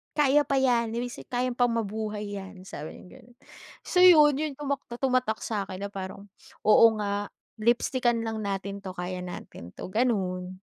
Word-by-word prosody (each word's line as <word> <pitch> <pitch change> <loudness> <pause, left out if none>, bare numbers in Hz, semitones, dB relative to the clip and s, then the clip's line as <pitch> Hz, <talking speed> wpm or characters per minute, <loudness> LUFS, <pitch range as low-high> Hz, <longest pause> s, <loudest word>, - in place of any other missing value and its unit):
"Kaya 295 -1 +4
pa 275 - +1
yan, 245 -4 +2
ibig 245 +1 -3
sabihin - - -11
kaya 250 +1 +1
pang 245 0 +2
mabuhay 210 -1 -3
yan", 190 -1 -10
sabi 155 -5 -8
niyang 180 - -14
gano'n. 240 +1 -20 0.5
So, 360 - 0
'yon, 315 -5 +8
yung 305 -3 -2
tumak 280 -1 -2 0.2
tumatak 255 -4 +1
sa'kin, 200 -3 -4
na - - -5
parang, 190 +1 -7 0.4
"Oo 215 +2 +7
nga, 205 0 -2 0.3
lipstickan 240 +1 +1
lang 220 -1 -3
natin 200 0 -3
'to, 190 -1 -7
kaya 180 +1 -4
natin 175 - -9
'to", 185 - -7
gano'n. 185 -6 -1
220 Hz, 170 wpm, -27 LUFS, 195-250 Hz, 0.5 s, yon